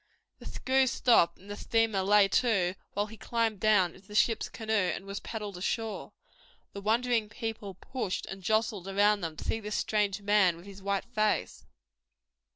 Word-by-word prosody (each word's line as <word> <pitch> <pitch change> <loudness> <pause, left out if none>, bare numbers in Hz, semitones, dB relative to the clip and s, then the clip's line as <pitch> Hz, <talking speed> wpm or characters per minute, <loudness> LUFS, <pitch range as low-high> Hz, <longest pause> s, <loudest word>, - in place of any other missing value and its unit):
The - - -11
screw 265 0 +1
stopped 235 -8 +3
and 195 - -18
the 205 - -6
steamer 225 -2 +1
lay 200 +1 +5
to 195 -7 +2 0.2
while 205 +1 0
he 220 +1 -12
climbed 225 -3 -1
down 205 -5 +3
into 190 +1 -18
the 210 - -10
ship's 225 +1 +2
canoe 220 -1 -4 0.2
and 195 - -8
was 200 0 -5
paddled 210 -4 -6
ashore. 220 +4 -3 0.6
The 200 - -7
wondering 225 +1 +1
people 225 -4 -5
pushed 220 -1 -4
and 195 0 -8
jostled 215 -1 0
around 205 +1 +3
them 160 -2 -5
to - - -7
see 225 - -1
this 210 -1 -5
strange 205 -1 0
man 200 -4 +3
with 170 - -14
his 200 -1 -11
white 200 0 -1
face. 215 -3 -1
210 Hz, 175 wpm, -29 LUFS, 195-225 Hz, 0.6 s, lay